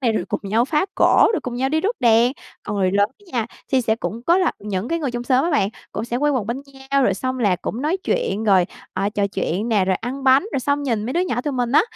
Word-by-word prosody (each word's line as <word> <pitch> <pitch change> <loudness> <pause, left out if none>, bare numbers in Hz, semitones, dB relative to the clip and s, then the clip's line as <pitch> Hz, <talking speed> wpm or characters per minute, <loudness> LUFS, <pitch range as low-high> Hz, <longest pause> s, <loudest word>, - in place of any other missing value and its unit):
này 230 -3 +2
rồi 180 - -1
cùng - - -2
nhau 220 +4 +1
phá 300 +7 0
cỗ, - - +5
rồi - - 0
cùng 250 -2 -5
nhau 260 +2 0
đi 315 +2 +1
rước 440 +6 -1
đèn. 235 +1 +4 0.3
Còn 210 - -4
người 185 -2 +2
lớn 200 +1 +3 0.2
nha, 235 -2 0 0.3
thì 260 - +4
sẽ 220 -2 0
cũng 230 +1 -5
có 340 +6 +3
là 365 - +2
những 200 +1 -4
cái 335 - 0
người 285 -5 -2
trong 240 0 -4
xóm 255 +4 +2
á 345 - 0
bạn, 240 - +2 0.2
cũng 220 - -3
sẽ 240 +1 -2
quây 295 +1 +2
quần 250 -7 -1
bên 250 +4 -3 0.3
nhau, 275 -1 +3
rồi 195 - +2
xong 255 +6 -3
là 200 -7 +2
cũng 235 +7 -5
nói 320 +5 +1
chuyện 225 - -1
rồi, 190 -4 +4 0.3
à, 195 +2 0
trò 205 -1 0
chuyện 200 +2 -2
nè, 205 -4 +3
rồi 185 -1 +1
ăn 265 +4 -6
bánh 265 +3 +6
rồi 265 - 0
xong 285 +2 0
nhìn 230 -5 -1
mấy 255 - -2
đứa 345 - +1
nhỏ 245 -10 -1
tụi 290 +1 -3
mình 245 -1 -1
á, - - +6
240 Hz, 285 wpm, -21 LUFS, 210-275 Hz, 0.3 s, bánh